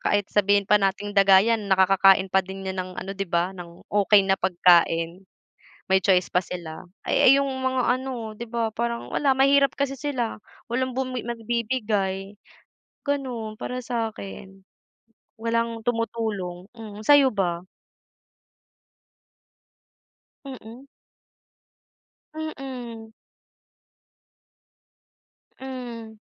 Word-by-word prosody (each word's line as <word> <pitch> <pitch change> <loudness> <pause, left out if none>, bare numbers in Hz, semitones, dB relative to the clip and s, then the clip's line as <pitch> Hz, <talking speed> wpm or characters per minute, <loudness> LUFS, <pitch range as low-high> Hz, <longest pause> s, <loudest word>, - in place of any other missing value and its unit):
kahit 205 0 +1
sabihin 205 0 +3
pa 210 +1 +4
nating 200 +1 -1
daga 195 -1 +6
yan 225 -3 0
nakakakain 190 0 +4
pa 190 - +5
din 190 +1 -9
yan 190 0 -3
ng 185 0 -6
ano 195 - -5
'di 195 0 -4
ba, 175 +2 0
ng 175 -2 -12
okey 205 0 +4
na 195 0 +1
pagkain, 175 -1 +3 0.7
may 190 - +5
choice 185 -1 +2
pa 180 - +3
sila. 175 -1 -8 0.2
Ay - - +4
ay, - - +9
yung 275 0 0
mga 260 -1 -1 0.2
ano 245 -5 -5
'di 235 +2 -8
ba 225 -1 -2
parang 235 +1 -3
wala, 275 -2 +2
mahirap 275 0 +4
kasi 280 -1 -1
sila, 265 -6 -3 0.3
walang 255 0 -1
bumi 255 -1 -2
nagbibigay, 220 -4 -2 0.8
gano'n 250 -6 -3
para 250 +3 -5
sa 235 -3 -2
akin. 195 -2 -10 0.8
Walang 230 0 -2
tumutulong, 220 -6 -3
mm, 215 -2 -10
sa'yo 285 +2 +6
ba? 180 -6 -2 2.8
Mm. 255 -1 -10 1.5
Mm. 255 -8 -7 2.5
Hmm. 240 -4 -8
220 Hz, 110 wpm, -24 LUFS, 195-250 Hz, 2.8 s, ay